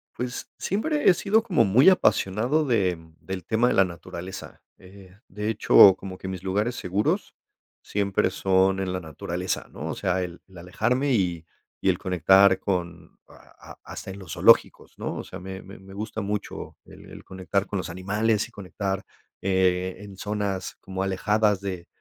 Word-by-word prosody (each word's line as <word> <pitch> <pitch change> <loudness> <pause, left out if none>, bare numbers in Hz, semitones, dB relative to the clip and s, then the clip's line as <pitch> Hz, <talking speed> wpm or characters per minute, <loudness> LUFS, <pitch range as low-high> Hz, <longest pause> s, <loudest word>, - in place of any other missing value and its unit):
Pues 125 0 -5
siempre 295 - +1
he - - +7
sido 215 +5 +2
como 205 -7 +3
muy 120 - +6
apasionado 130 - +2
de, 100 -9 +1
mm, 80 -1 -18
del 95 -2 -6
tema 110 +5 +2
de - - +2
la 95 - +5
naturaleza. 90 +1 -9 0.2
Eh, 95 0 -16
de 105 +3 -4
hecho, 100 -3 +7
como 95 -1 -8
que 95 - -8
mis 95 -1 -6
lugares 105 +6 -1
seguros 100 +1 -1 0.5
siempre 100 -2 0
son 95 0 +2
en 95 -1 -2
la 95 - -2
naturaleza, 85 +3 -4
¿no? - - -6
O - - -3
sea, 90 0 0
el 90 -1 -8
el 95 -1 -16
alejarme 125 +10 0
y 90 -6 0 0.3
y - - +1
el - - +1
conectar 95 +2 +4
con 90 -3 -4
a - - -17
a - - -22
hasta - - -8
en 95 - -9
los 95 -4 -8
zoológicos, - - +3
¿no? - - -4
O - - -5
sea, - - -9
me 95 +1 -7
me 95 +2 -12
me 95 +1 -14
gusta 110 +2 -5
mucho 105 +1 -5
el - - -14
el - - -11
conectar 95 +1 -2
con 100 - -3
los 90 -1 -4
animales 105 +5 0
y - - -21
conectar, 95 -1 -4 0.4
eh, 95 -1 +1
en 100 -2 -11
zonas 100 -2 -3
como 95 0 -4
alejadas 105 +1 +1
de 95 -3 -5
95 Hz, 180 wpm, -25 LUFS, 95-105 Hz, 0.5 s, he